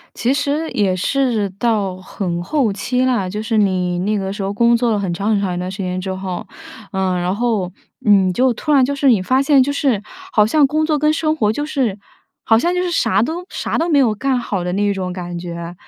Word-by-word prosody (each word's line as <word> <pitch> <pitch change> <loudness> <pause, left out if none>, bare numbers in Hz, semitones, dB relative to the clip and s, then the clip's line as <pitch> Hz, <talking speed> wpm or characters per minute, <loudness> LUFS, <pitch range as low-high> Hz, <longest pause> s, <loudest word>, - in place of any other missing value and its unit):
其 245 - +1
实 290 +3 -1
也 195 -3 +1
是 230 -1 0
到 205 -6 0
很 180 -2 -4
后 265 - 0
期 250 +6 -1
啦， 240 -8 +1
就 210 +3 -4
是 220 0 0
你 180 -3 +1
那 210 +3 0
个 195 0 -3
时 200 0 -5
候 195 +1 -2
工 235 +3 +3
作 235 0 +1
了 210 - +1
很 190 -3 -2
长 200 +5 -1
很 205 -2 +2
长 185 -3 -1
一 175 - -3
段 180 +1 -3
时 195 - -8
间 185 -1 -2
之 190 0 -4
后， 185 -1 -5 0.5
呃， 190 -1 0
然 180 +2 -1
后， 210 -5 -1 0.3
你 195 -3 +4
就 255 +5 +2
突 300 - -2
然 270 -3 +5
就 280 - -1
是 280 -1 +2
你 220 -7 +4
发 260 +7 +2
现， 275 -2 +5
就 285 - 0
是 260 -8 0 0.3
好 210 -1 +4
像 290 +5 +4
工 310 +3 0
作 305 -2 +1
跟 305 +1 +3
生 310 0 0
活 215 -6 +1
就 290 +5 -3
是 250 -10 -1 0.5
好 225 0 +4
像 350 +7 +1
就 360 - 0
是 360 - -1
啥 230 -9 +2
都 330 +8 -3
啥 - - -3
都 330 - 0
没 300 -4 +3
有 235 -6 +3
干 260 +3 0
好 200 -7 -3
的 180 - -2
那 205 +1 +1
种 185 -2 -3
感 175 -1 -6
觉， 170 0 -6
215 Hz, 260 characters per minute, -18 LUFS, 190-270 Hz, 0.5 s, 然